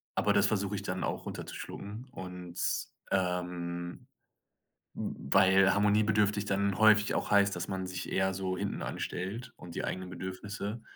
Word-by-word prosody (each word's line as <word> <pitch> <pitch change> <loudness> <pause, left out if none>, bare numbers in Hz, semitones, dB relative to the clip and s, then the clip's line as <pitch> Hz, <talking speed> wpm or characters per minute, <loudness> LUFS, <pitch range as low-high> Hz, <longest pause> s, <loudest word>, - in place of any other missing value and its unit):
aber - - +3
das - - +5
versuche 100 -1 0
ich 100 - -3
dann 90 -1 -2
auch, - - -2
runterzuschlucken. 105 +5 -6
Und, 90 -1 -7 0.5
ähm, 90 -2 -2 0.9
hm, - - -5
weil 95 0 +6
harmoniebedürftig 105 0 +3
dann 100 -1 +1
häufig 110 0 +6
auch - - -1
heißt, 100 -1 +5
dass 90 +2 -4
man 95 -1 -2
sich 90 -1 -5
eher 95 0 +2
so 95 -1 -2
hinten 100 +1 -2
anstellt 100 +7 -4
und 85 -2 -10
die - - -1
eigenen 95 -1 -4
Bedürfnisse. 100 +4 -5
95 Hz, 150 wpm, -31 LUFS, 90-100 Hz, 0.9 s, weil